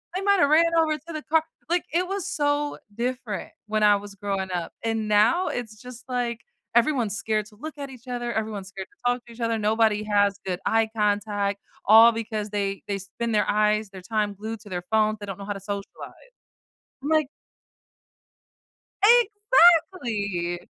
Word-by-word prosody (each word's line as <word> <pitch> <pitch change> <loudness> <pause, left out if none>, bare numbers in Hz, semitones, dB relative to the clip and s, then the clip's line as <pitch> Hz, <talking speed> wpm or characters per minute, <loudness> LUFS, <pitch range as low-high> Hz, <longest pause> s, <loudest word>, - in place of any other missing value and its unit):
They 375 - -1
might 400 0 +3
have 285 - +5
ran 335 +2 +4
over 315 -1 +3
to 330 +4 -11
the 310 -1 -5
car 320 0 +2 0.3
Like, 350 0 +1
it 355 +2 +2
was 390 -1 -3
so 290 -4 0 0.2
different 240 -3 -3 0.2
when 215 0 0
I 210 -1 +6
was 200 0 -10
growing 195 -1 -3
up, 175 -2 -3
and 225 -1 -1
now, 225 - +3
it's 220 -6 -6
just 250 -1 -11
like 240 -2 -2 0.3
everyone's 235 -4 +2
scared 215 -2 -1
to 210 - -18
look 305 +6 -8
at 280 -1 -6
each 250 -2 -14
other. 240 -1 -3
Everyone's 215 -3 -3
scared 195 -1 -8
to - - -31
talk 245 -1 -9
to 235 - -14
each 230 - -16
other. 230 -1 0
Nobody 215 0 +2
has 205 -1 +2
good 180 -2 -2
eye 225 0 +2
contact 205 -1 0 0.2
all 225 +2 +8
because 220 -2 -4
they 200 -1 -2
they 200 -1 -1
spend 230 +4 -4
their 210 - +2
eyes 210 0 +2
their 190 -1 -10
time 210 +1 -1
glued 220 +2 -6
to 205 - -13
their 180 -2 -4
phones. 215 -1 +2
They 205 - -6
don't 195 0 -6
know 200 - -7
how 205 - -3
to 195 - -8
socialize. 200 - -8 0.7
I'm - - -3
like 310 -2 +3 2.4
Exactly. 215 - -1
220 Hz, 185 wpm, -25 LUFS, 205-255 Hz, 2.4 s, all